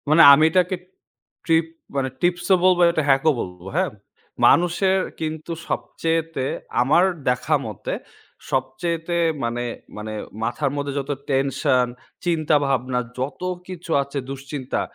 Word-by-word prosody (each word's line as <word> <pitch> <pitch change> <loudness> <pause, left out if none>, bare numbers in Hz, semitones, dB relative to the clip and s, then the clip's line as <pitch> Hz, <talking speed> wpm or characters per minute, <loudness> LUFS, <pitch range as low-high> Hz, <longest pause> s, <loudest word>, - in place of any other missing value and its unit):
মানে 155 +2 +6
আমি 145 +2 +5
এটাকে 180 +2 +2 0.7
ট্রিপ 165 -1 +3 0.3
মানে 135 -1 0
টিপস 175 0 +1
ও - - +8
বলবো 185 -1 +5 0.3
হ্যাক 135 0 +5
ও - - +6
বলবো, 90 -2 -6
হ্যাঁ। - - +1 0.5
মানুষের 185 +2 +4 0.2
কিন্তু 160 +1 -4 0.2
সবচেয়েতে 165 -4 -1 0.4
আমার 145 +8 +4 0.3
দেখা 125 +5 +1
মতে 110 -3 -5 0.6
সবচেয়েতে 165 +6 -1 0.3
মানে, 120 +1 -1 0.3
মানে, 110 +1 -5 0.3
মাথার 135 +4 -1
মধ্যে 140 -1 -2
যত 140 +1 -4 0.2
টেনশন 135 -2 +2 0.4
চিন্তাভাবনা 140 -6 +1 0.2
যত 130 +6 -4 0.3
কিছু 175 -2 -7
আছে 140 +1 -7
দুশ্চিন্তা 135 -1 -4
145 Hz, 120 wpm, -22 LUFS, 130-165 Hz, 0.7 s, ও